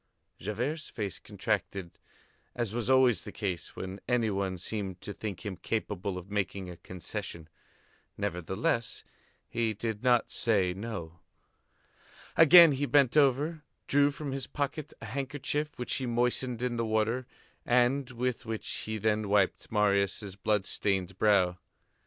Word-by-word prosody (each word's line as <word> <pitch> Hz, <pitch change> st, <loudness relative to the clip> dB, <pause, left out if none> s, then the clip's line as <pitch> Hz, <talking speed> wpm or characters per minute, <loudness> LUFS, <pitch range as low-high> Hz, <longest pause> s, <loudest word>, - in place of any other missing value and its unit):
Javert's 125 Hz, -, -3 dB
face 100 Hz, -5 st, -4 dB
contracted 95 Hz, -4 st, -3 dB, 0.6 s
as 115 Hz, -4 st, -1 dB
was 120 Hz, +1 st, -2 dB
always 130 Hz, -6 st, +5 dB
the -, -, -8 dB
case 95 Hz, -5 st, -3 dB
when 95 Hz, +1 st, -6 dB
any 120 Hz, -3 st, +2 dB
one 95 Hz, -1 st, -1 dB
seemed 95 Hz, 0 st, -4 dB
to 105 Hz, -, -6 dB
think 105 Hz, 0 st, -6 dB
him 100 Hz, -2 st, -3 dB
capable 100 Hz, -4 st, -2 dB
of 90 Hz, +2 st, -9 dB
making 100 Hz, -2 st, -2 dB
a 85 Hz, -, -10 dB
concession. 85 Hz, -2 st, -6 dB, 0.7 s
Nevertheless, 100 Hz, +4 st, -1 dB, 0.4 s
he 115 Hz, -2 st, -1 dB
did 110 Hz, 0 st, -3 dB
not 125 Hz, -2 st, +3 dB
say 100 Hz, -6 st, +2 dB
"no." 95 Hz, -5 st, -6 dB, 1.2 s
Again 165 Hz, 0 st, +9 dB
he 140 Hz, +1 st, 0 dB
bent 140 Hz, -3 st, +4 dB
over, 150 Hz, +3 st, +3 dB, 0.2 s
drew 145 Hz, 0 st, +4 dB
from 145 Hz, 0 st, -5 dB
his 135 Hz, -1 st, -4 dB
pocket 150 Hz, +1 st, -3 dB
a -, -, -6 dB
handkerchief 145 Hz, +4 st, -3 dB
which 125 Hz, -1 st, -3 dB
he 130 Hz, -, -1 dB
moistened 120 Hz, 0 st, 0 dB
in 120 Hz, -1 st, -1 dB
the 115 Hz, -, +1 dB
water 110 Hz, +3 st, 0 dB, 0.4 s
and 125 Hz, +2 st, +2 dB
with 125 Hz, 0 st, -2 dB
which 110 Hz, -1 st, -5 dB
he 110 Hz, 0 st, -3 dB
then 105 Hz, 0 st, 0 dB
wiped 100 Hz, -2 st, +2 dB
Marius' 100 Hz, -1 st, +1 dB
blood 100 Hz, 0 st, 0 dB
stained 95 Hz, -3 st, -1 dB
brow. 95 Hz, -4 st, +3 dB
110 Hz, 140 wpm, -30 LUFS, 100-125 Hz, 1.2 s, Again